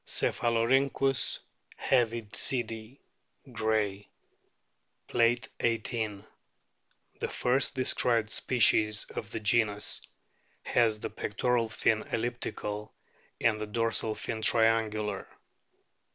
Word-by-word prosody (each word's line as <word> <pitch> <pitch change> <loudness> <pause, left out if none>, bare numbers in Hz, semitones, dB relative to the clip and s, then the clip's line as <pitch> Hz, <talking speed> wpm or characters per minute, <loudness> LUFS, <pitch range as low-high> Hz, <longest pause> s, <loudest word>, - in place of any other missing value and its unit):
Cepkalorhynchus 130 +3 +1 0.4
heavidsidii, 115 0 -1 0.5
Gray 110 -3 -1 0.5
* - - -47
(Plate 115 -1 +2
XVIII.), 110 -3 -1 1.0
the - - -1
first 130 +3 +1
described 120 -3 +1
species 110 -3 +2
of - - -5
the - - -4
genus, 105 -1 +1 0.6
has 110 -3 +2
the - - -4
pectoral 115 +2 0
fin 110 0 +1
elliptical 110 -3 -3 0.5
and 110 -2 +2
the 110 - -3
dorsal 115 0 -1
fin 110 -1 -4
triangular. 110 -2 +2
115 Hz, 85 wpm, -30 LUFS, 105-120 Hz, 1.0 s, Plate